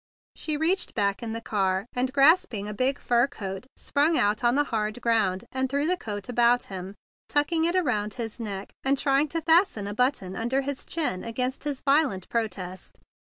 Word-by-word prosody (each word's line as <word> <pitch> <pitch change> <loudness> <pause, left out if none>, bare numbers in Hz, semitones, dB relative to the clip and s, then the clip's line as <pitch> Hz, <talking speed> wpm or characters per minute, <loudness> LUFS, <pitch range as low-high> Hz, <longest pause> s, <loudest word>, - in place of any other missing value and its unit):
She 305 -2 -1
reached 350 +5 +1
back 200 -1 0
in 230 -2 -4
the 230 - -3
car, 195 -3 0
and, 250 +1 0
grasping 275 - +4
a 210 - -4
big 260 +5 +1
fur 240 +1 +2
coat, 195 -2 -7
sprang 305 +3 +1
out 210 +3 +1
on 240 +1 +3
the 290 - +4
hard 215 +1 -1
ground, 215 -6 +1
and 260 0 -1
threw 280 +2 0
the 360 +3 +2
coat 205 - -6
about 240 0 +3
him, 190 +1 -6 0.3
tucking 320 +3 +2
it 345 +2 +1
around 215 - 0
his 230 -2 -5
neck 200 -3 -5
and 275 +1 +2
trying 275 +2 +2
to 330 +2 -3
fasten 325 - +3
a 205 - -4
button 230 -6 0
under 240 +6 0
his 275 0 -4
chin 290 - -1
against 250 +4 -3
his 285 -3 -3
violent 275 - +2
protest. 190 -5 -4
245 Hz, 190 wpm, -26 LUFS, 205-285 Hz, 0.3 s, grasping